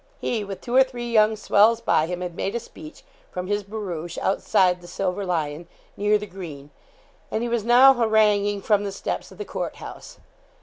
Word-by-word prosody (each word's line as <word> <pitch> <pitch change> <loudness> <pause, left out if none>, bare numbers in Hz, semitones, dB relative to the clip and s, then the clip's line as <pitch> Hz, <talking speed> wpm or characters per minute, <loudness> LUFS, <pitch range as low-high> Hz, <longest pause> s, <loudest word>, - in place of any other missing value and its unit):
He, 225 -4 -2
with 195 -1 -7
two 240 - -6
or 265 - +8
three 240 -2 -6
young 215 -1 +4
swells 215 +2 +4
by 160 -8 +2
him, 180 +1 -4
had 175 -2 -5
made 195 +5 -3
a - - 0
speech, 155 -8 -13 0.3
from 180 0 -5
his 205 +2 -1
barouche, 190 -5 -6
outside 180 -2 +2
the 175 - -12
'Silver 190 +2 -3
Lion,' 160 -1 -2 0.3
near 210 +1 +2
the 210 - -6
green; 165 -7 -9 0.6
and 220 - -2
he - - -1
was 235 -2 0
now 250 +4 +7
haranguing 210 -4 +2
from 205 -2 +2
the 200 - -3
steps 195 - -5
of - - -14
the 420 - -5
Court - - -4
House. - - -10
205 Hz, 200 wpm, -24 LUFS, 180-220 Hz, 0.6 s, or